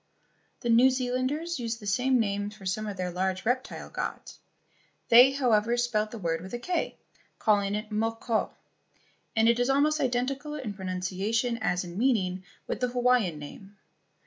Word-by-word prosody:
The 240 - -2
New 240 +3 +6
Zealanders 260 +6 -1
used 230 -1 -3
the 210 - -11
same 250 +6 +2
names 205 -1 -1
for 200 - -13
some 215 +3 -2
of 200 -2 -5
their 180 -1 -2
large 185 +2 -2
reptile 255 +3 -2
gods. - - -5 0.7
They, 245 +2 +9
however, 240 -4 +2
spelled 225 -3 0
the 230 - -8
word 165 -4 -2
with 190 +6 -6
a - - -2
"k," 350 +9 -2 0.4
calling 205 -2 +2
it 210 +1 -5
mo 225 +2 0
ko, 225 -1 -1 0.9
and 220 0 +4
it 235 +1 +4
was 245 +2 +1
almost 300 +3 +3
identical 270 +4 -1
in 255 -8 -5
pronunciation 195 +5 -2
as 180 -5 0
in 175 +2 -7
meaning 190 -8 +1 0.2
with - - -3
the 250 - +1
Hawaiian 245 -8 +2
name. 195 +7 -11
225 Hz, 170 wpm, -28 LUFS, 200-250 Hz, 0.9 s, They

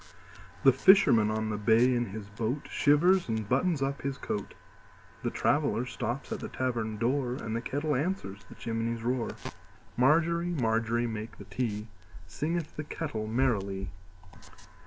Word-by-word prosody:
The - - +8
fisherman 155 - +6
on 110 0 -1
the 105 - -3
bay 115 +4 +4
in 120 -1 0
his 100 +1 -7
boatShivers 145 - +2
and 110 -2 -2
buttons 140 - +1
up 140 +1 -2
his 140 -1 -3
coat; 105 - -4 0.7
The - - -1
traveller 145 -4 +1
stops 125 +1 -4
at - - -2
the - - -6
tavern 115 -4 -2
door, 125 +2 0
And 110 -3 -4
the 115 - -1
kettle 145 +3 -1
answers 125 - -3
the - - -11
chimney's 115 0 -3
roar. 125 0 0 0.7
Margery, 170 +6 +3
Margery, 115 0 +1
make 110 -1 -5
the - - -9
tea, 110 -4 -3 0.4
Singeth 160 - -3
the 150 - -3
kettle 145 -8 -4
merrily. 100 -6 0
120 Hz, 145 wpm, -29 LUFS, 110-145 Hz, 0.7 s, The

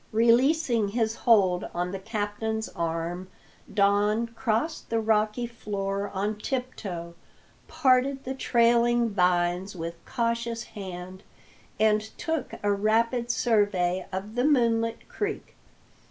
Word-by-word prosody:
Releasing 235 +1 +3
his 220 +1 0
hold 200 -7 +3
on 175 +1 -1
the 195 - -4
captain's 220 +1 -3
arm, 170 +2 -3 0.4
Don 205 +2 +2
crossed 235 +7 -2
the 230 - +1
rocky 220 +1 +1
floor 200 -3 -3
on 205 +2 -2
tiptoe, 205 -10 -4 0.5
parted 270 -2 +2
the 260 - -3
trailing 235 -2 +3
vines 180 0 +1
with 170 0 -6
cautious 235 0 -1
hand, 185 -2 -8 0.6
and 215 0 +4 0.2
took 320 -5 -3
a 205 - +2
rapid 230 +4 +1
survey 205 -7 +1
of 195 +3 -5
the 245 +1 0
moonlit 230 -5 +2
creek. 420 0 -4
220 Hz, 110 wpm, -27 LUFS, 195-235 Hz, 0.6 s, and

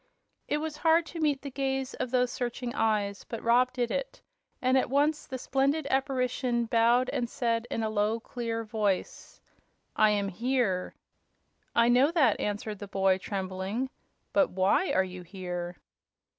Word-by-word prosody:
It 295 - +1
was 305 0 -4
hard 325 +1 +4
to 335 - -5
meet 295 -4 +1
the 280 - -6
gaze 270 0 -2
of 255 - -3
those 250 0 +2
searching 245 0 -3
eyes, 205 -2 0
but 230 - -7
Rob 245 +2 +4
did 245 -2 -1
it, - - -3 0.4
and 255 +1 +2
at 260 - +2
once 295 +3 +1
the 260 - -4
splendid 275 +4 0
apparition 255 -3 0
bowed 235 +2 +3
and 240 -1 -2
said 230 -1 -1
in 225 - -2
a 220 - 0
low, 215 +2 +1
clear 230 -1 -4
voice: 210 -3 -2 0.6
"I 215 - +5
am 200 -1 +1
here." 225 -3 -1 0.8
"I 235 0 +5
know 255 +4 +5
that," 290 - +3
answered 210 0 -3
the 205 - -7
boy, 190 -1 +2
trembling, 195 +6 -3 0.4
"but 290 -3 +4
WHY 190 - +2
are 190 - +3
you 185 -1 -7
here?" 175 -1 -6
235 Hz, 160 wpm, -29 LUFS, 205-265 Hz, 0.8 s, I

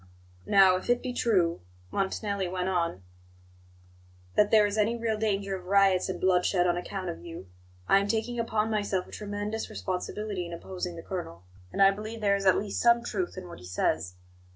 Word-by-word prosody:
"Now, 190 -2 +6
if 185 - -8
it 245 0 +2
be 255 -1 -3
true," 185 -9 +1 0.3
Montanelli 200 0 -1
went 180 +1 -2
on, 170 - -1 1.3
"that 210 -1 +4
there 215 -2 +6
is 205 0 -1
any 220 +2 +2
real 225 -1 -1
danger 200 -2 -1
of 180 -1 -9
riots 195 -1 +4
and 185 - -3
bloodshed 180 0 +2
on 175 -1 +2
account 185 +1 -4
of 170 - -7
you, 165 - -9 0.4
I 195 - +6
am 200 - -1
taking 230 +3 -1
upon 220 -1 0
myself 205 -3 0
a - - -16
tremendous 205 +1 -4
responsibility 185 0 -4
in 170 - -8
opposing 180 0 -5
the 165 - -8
colonel; 130 - -6 0.3
and 195 - +3
I 195 - +7
believe 215 +3 -6
there 200 -2 +3
is 195 -1 -1
at 190 - +6
least 200 -1 -2
some 235 0 +5
truth 355 - -3
in 185 -1 -7
what 170 - -10
he 90 - -12
says. 90 0 -1
195 Hz, 195 wpm, -28 LUFS, 180-215 Hz, 1.3 s, I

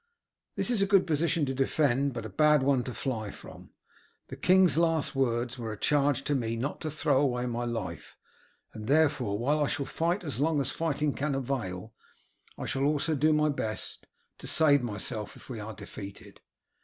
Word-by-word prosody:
This - - +1
is 225 -5 +2
a 195 - +3
good 195 -1 +4
position 160 0 +1
to 135 - -2
defend, 135 0 +1
but 115 -2 -5
a - - -5
bad 150 +6 +4
one 135 -2 +2
to 125 - -5
fly 110 -6 -3
from. - - -12 0.6
The - - -6
king's 185 -3 +4
last 165 -2 +1
words 125 -1 0
were 115 -2 -4
a 105 - -6
charge 140 +1 +2
to 145 - -1
me 115 -4 -1
not 130 +6 -4
to 155 - -3
throw 145 -2 +1
away 125 -3 0
my 120 0 -2
life, 115 -9 -5 0.6
and 110 0 -8
therefore 145 -8 +2
while 145 +6 +1
I - - +1
shall 140 +1 -2
fight 170 +6 -1
as 145 -7 -3
long 155 +1 +2
as 135 -1 -1
fighting 150 -3 -1
can 145 0 -2
avail, 115 -6 -4 0.6
I - - -5
shall 135 - -2
also 150 +2 +1
do 155 +2 +3
my 150 0 +3
best 110 -7 -3 0.3
to - - -8
save 145 -3 +4
myself 105 -2 -4
if - - -15
we 115 - -5
are 105 0 -7
defeated. 100 +1 -10
140 Hz, 195 wpm, -29 LUFS, 120-150 Hz, 0.6 s, good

